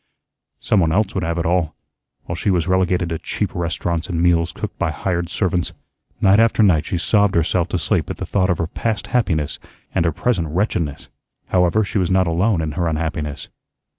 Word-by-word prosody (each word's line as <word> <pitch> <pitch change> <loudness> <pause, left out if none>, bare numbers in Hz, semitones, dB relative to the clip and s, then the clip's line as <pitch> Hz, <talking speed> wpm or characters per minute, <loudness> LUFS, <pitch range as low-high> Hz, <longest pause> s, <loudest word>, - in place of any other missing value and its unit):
Some 105 - +2
one 80 -3 +2
else 100 +3 +1
would - - -1
have 85 +1 -1
it 85 - -1
all, 85 -2 +1 0.5
while 85 - -5
she 95 - -1
was 90 -4 +2
relegated 90 -1 +1
to 80 -1 -3
cheap - - -3
restaurants 85 0 -2
and 85 -3 -1
meals 85 -1 +2
cooked - - -6
by - - +1
hired 85 -2 -2
servants. 90 -2 -1 0.5
Night 95 +2 +5
after 115 -1 +4
night 85 -7 +3
she 90 - -1
sobbed 100 +3 +2
herself 85 +1 +1
to 90 - -1
sleep 85 - 0
at - - -4
the - - -4
thought 95 -2 +1
of 90 - +2
her 85 - -1
past 105 +3 -3
happiness 80 - 0 0.3
and - - +2
her 85 - +2
present 90 -1 0
wretchedness. 80 -3 -2 0.4
However, 90 +4 +3
she 100 - -1
was 90 - 0
not 95 0 +3
alone 85 +3 +1
in 80 - -2
her 85 +1 -1
unhappiness. 75 -2 -3
85 Hz, 200 wpm, -20 LUFS, 80-95 Hz, 0.5 s, Night